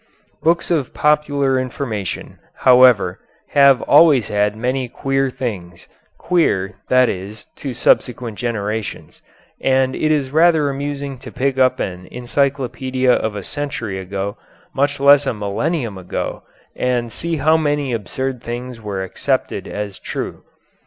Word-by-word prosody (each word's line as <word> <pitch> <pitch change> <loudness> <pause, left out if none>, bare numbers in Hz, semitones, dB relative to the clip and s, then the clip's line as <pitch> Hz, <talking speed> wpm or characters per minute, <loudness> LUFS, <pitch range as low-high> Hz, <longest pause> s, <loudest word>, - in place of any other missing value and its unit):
Books 170 +2 +1
of 150 -7 -1
popular 145 -3 +2
information, 120 -8 -4 0.2
however, 125 -8 +5 0.3
have 140 -2 +5
always 145 -6 +5
had 105 0 +1
many 125 +2 -1
queer 135 +1 0
things, 100 -10 -6 0.3
queer, 130 - +1 0.2
that 130 0 +5
is, 100 +2 -6
to 140 - -5
subsequent 120 -2 +1
generations, 110 -2 -4 0.4
and 130 0 +2
it 155 - +1
is 140 -4 0
rather 160 -2 +4
amusing 140 -1 -4
to - - -10
pick 135 0 -1
up 130 -1 +3
an 90 -1 -4
encyclopedia 130 0 0
of 110 -1 -1
a 100 - -5
century 120 -7 -4
ago, 100 +2 -4 0.4
much 140 +1 0
less 140 0 +6
a 120 - 0
millennium 105 - -2
ago, 90 - -4 0.3
and 120 -2 -1
see 170 +6 -3
how 155 +2 +3
many 145 -4 0
absurd 125 +4 -3
things 120 0 -6
were 100 -3 -4
accepted 95 - -2
as 105 -2 -5
true. - - -5
130 Hz, 130 wpm, -19 LUFS, 105-140 Hz, 0.4 s, less